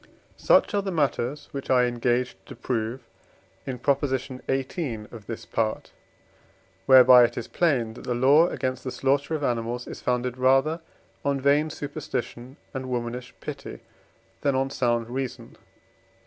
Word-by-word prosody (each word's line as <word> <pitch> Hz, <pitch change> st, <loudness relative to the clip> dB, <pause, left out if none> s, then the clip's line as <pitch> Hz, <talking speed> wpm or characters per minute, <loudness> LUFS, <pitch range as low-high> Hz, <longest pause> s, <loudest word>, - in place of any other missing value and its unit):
Honestas -, -, -20 dB
Such -, -, +5 dB
are 205 Hz, -, +2 dB
the 195 Hz, -1 st, -3 dB
matters 145 Hz, -2 st, -1 dB
which 140 Hz, -1 st, -6 dB
I 125 Hz, -1 st, +5 dB
engaged 120 Hz, -4 st, -1 dB
to -, -, -9 dB
prove 120 Hz, +1 st, -3 dB, 0.7 s
in 130 Hz, -2 st, -3 dB
Prop. 140 Hz, +3 st, +1 dB
xviii. 130 Hz, -1 st, -3 dB
of 110 Hz, -3 st, -11 dB
this 115 Hz, -, -6 dB
Part, 110 Hz, -1 st, -2 dB, 1.0 s
whereby 130 Hz, -1 st, +9 dB
it 120 Hz, -, 0 dB
is 120 Hz, -, -4 dB
plain 130 Hz, -10 st, +1 dB
that 120 Hz, -, -11 dB
the 125 Hz, -2 st, -1 dB
law 140 Hz, +7 st, +5 dB
against 130 Hz, -6 st, -3 dB
the 130 Hz, -, -3 dB
slaughtering 140 Hz, +4 st, 0 dB
of 145 Hz, -, -7 dB
animals 120 Hz, -1 st, -1 dB
is -, -, -8 dB
founded 125 Hz, 0 st, -1 dB
rather 135 Hz, +6 st, +3 dB, 0.4 s
on 140 Hz, -1 st, 0 dB
vain 145 Hz, +3 st, +3 dB
superstition 135 Hz, -4 st, -5 dB, 0.2 s
and 130 Hz, -1 st, -5 dB
womanish 125 Hz, 0 st, -4 dB
pity -, -, -7 dB, 0.6 s
than 140 Hz, -2 st, +1 dB
on 135 Hz, +1 st, 0 dB
sound 120 Hz, -3 st, 0 dB
reason. 125 Hz, -1 st, -5 dB
130 Hz, 150 wpm, -25 LUFS, 120-140 Hz, 1.0 s, whereby